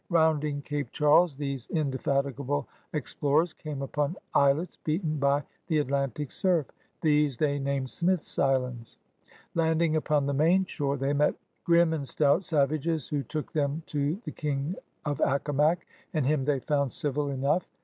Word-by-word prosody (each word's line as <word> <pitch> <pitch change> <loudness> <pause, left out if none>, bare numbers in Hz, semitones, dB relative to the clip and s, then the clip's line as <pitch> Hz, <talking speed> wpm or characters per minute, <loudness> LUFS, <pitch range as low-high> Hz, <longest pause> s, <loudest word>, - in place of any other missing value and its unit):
Rounding 155 -4 +2
Cape 145 -4 -3
Charles 150 +2 +4
these 140 -3 -4
in 155 -4 0
defatigable 140 +1 -1 0.3
explorers 150 +2 0
came 145 -3 -6
upon 150 +4 -1 0.2
islets 140 +5 +2
beaten 155 -1 -1
by 140 +1 +2 0.2
the 160 - +1
Atlantic 140 -1 -1
surf. 175 -6 +1 0.4
These 150 -4 +3
they 145 0 +1
named 135 -1 -2
Smith's 180 -1 +1
Islands. 125 -4 0 0.6
Landing 160 -1 +2
upon 150 -2 +1
the 140 - 0
main 170 +7 +3
shorcr 145 -5 -2
they 135 +2 0
met 150 +1 +2 0.3
^'grimme 170 -1 +5
and 145 -4 -3
stout'' 150 +7 +2
savages, 155 -1 0
who 145 -1 0
took 150 +4 -5
them 150 +1 -1
to 150 +5 -1
the - - -4
King 150 +2 -2 0.3
of 145 -3 -2
Accomac, 145 +4 +2 0.3
and 150 -4 +1
him 140 -1 +1
they 145 -2 +1
found 140 -2 +1
dvil 145 +2 -1
enough. 140 +6 0
145 Hz, 150 wpm, -28 LUFS, 140-155 Hz, 0.6 s, ^'grimme